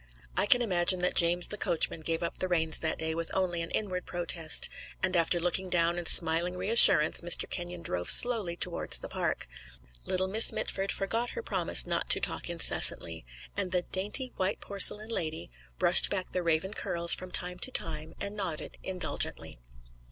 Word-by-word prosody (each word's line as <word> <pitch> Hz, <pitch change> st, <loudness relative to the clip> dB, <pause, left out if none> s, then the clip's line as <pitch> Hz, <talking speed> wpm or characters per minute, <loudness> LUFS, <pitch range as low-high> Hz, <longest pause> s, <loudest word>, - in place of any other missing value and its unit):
I -, -, 0 dB
can 245 Hz, +3 st, +3 dB
imagine 180 Hz, -3 st, +1 dB
that 180 Hz, -, -1 dB
James 175 Hz, +1 st, +1 dB
the 210 Hz, -, -8 dB
coachman 165 Hz, 0 st, 0 dB
gave 165 Hz, +1 st, -4 dB
up 170 Hz, -, -5 dB
the 185 Hz, -, -2 dB
reins 160 Hz, -3 st, 0 dB
that 160 Hz, -1 st, -4 dB
day 160 Hz, 0 st, -4 dB
with 165 Hz, 0 st, -3 dB
only 180 Hz, -3 st, -2 dB
an 165 Hz, -, -7 dB
inward 185 Hz, -4 st, -5 dB
protest, 170 Hz, -2 st, -1 dB, 0.4 s
and 185 Hz, -1 st, -1 dB
after 170 Hz, +1 st, 0 dB
looking 180 Hz, +2 st, -3 dB
down 170 Hz, -1 st, 0 dB
and 175 Hz, -, -6 dB
smiling 170 Hz, +2 st, +1 dB
reassurance 185 Hz, -5 st, +4 dB
Mr. 175 Hz, 0 st, +3 dB
Kenyon 175 Hz, -1 st, -6 dB
drove 90 Hz, -, -2 dB
slowly 220 Hz, -8 st, +6 dB
towards 175 Hz, 0 st, 0 dB
the -, -, -8 dB
Park; -, -, -4 dB, 0.6 s
little 185 Hz, 0 st, -1 dB
Miss 215 Hz, +4 st, +6 dB
Mitford 195 Hz, 0 st, -4 dB
forgot 230 Hz, +5 st, -2 dB
her 470 Hz, -, -7 dB
promise -, -, +4 dB
not -, -, -3 dB
to -, -, +7 dB
talk -, -, -4 dB
incessantly; 85 Hz, -, 0 dB, 0.3 s
and 195 Hz, -3 st, -4 dB
the 180 Hz, -1 st, -1 dB
"dainty, 210 Hz, +7 st, -3 dB
white 190 Hz, +1 st, -2 dB
porcelain 205 Hz, +2 st, +2 dB
lady" 160 Hz, -, -5 dB, 0.3 s
brushed -, -, +5 dB
back 185 Hz, -2 st, -4 dB
the 180 Hz, -, -3 dB
raven 170 Hz, +3 st, -2 dB
curls 170 Hz, -4 st, +2 dB
from 185 Hz, -, -4 dB
time 180 Hz, 0 st, -3 dB
to 260 Hz, -, -2 dB
time 160 Hz, -8 st, -6 dB
and 200 Hz, +1 st, -5 dB
nodded 185 Hz, -7 st, -6 dB
indulgently. 180 Hz, -, -2 dB
180 Hz, 180 wpm, -28 LUFS, 165-190 Hz, 0.6 s, to